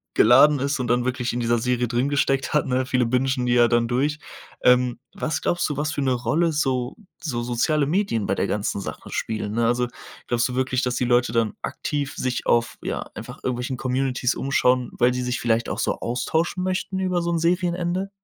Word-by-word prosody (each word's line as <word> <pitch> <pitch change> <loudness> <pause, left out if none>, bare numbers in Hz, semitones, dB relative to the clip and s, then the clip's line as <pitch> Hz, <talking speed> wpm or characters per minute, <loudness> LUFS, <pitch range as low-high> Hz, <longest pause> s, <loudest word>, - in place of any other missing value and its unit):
geladen 140 +5 +6
ist 140 +1 -1
und 125 - -2
dann 120 +1 +1
wirklich 125 -1 -1
in 120 - -3
dieser 120 -1 +1
Serie 125 0 0
drin 125 +4 0
gesteckt 135 -1 0
hat, 150 - +2
ne? 130 0 0
Viele 125 -2 +1
Bingen 130 +1 0
die 120 - +2
ja 120 -1 +5
dann 120 -1 +2
durch. 145 +5 0 0.4
Ähm, 125 -1 +4
was 155 -1 -2
glaubst 175 -2 0
du, 145 - -3
was 150 +1 -1
für - - -2
'ne 130 -1 +1
Rolle 125 +8 +1
so 130 - -1 0.2
so 125 -8 -2
soziale 140 +5 +1
Medien 155 - 0
bei 95 - 0
der - - 0
ganzen 100 -1 -2
Sache - - -8
spielen, 110 -2 -3
ne? 115 +1 +1
Also, 120 +1 +1 0.4
glaubst 120 +1 +1
du 125 - -5
wirklich, 130 0 0
dass 125 -1 -1
die 125 - 0
Leute 120 0 +2
dann 115 -2 +1
aktiv, 145 -1 -3
sich 125 -1 -2
auf, 120 0 +2
ja, - - -4
einfach - - -8
irgendwelchen 125 +1 -2
Communitys 130 0 0
umschauen, 125 -3 +1
weil 125 +1 +3
sie 125 - -2
sich 125 0 -2
vielleicht 115 0 0
auch - - -3
so - - -1
austauschen 160 +9 -1
möchten 185 0 -2
über 180 -2 0
so 170 - -2
'n 170 - 0
Serienende? 175 +2 0
125 Hz, 210 wpm, -23 LUFS, 120-150 Hz, 0.4 s, geladen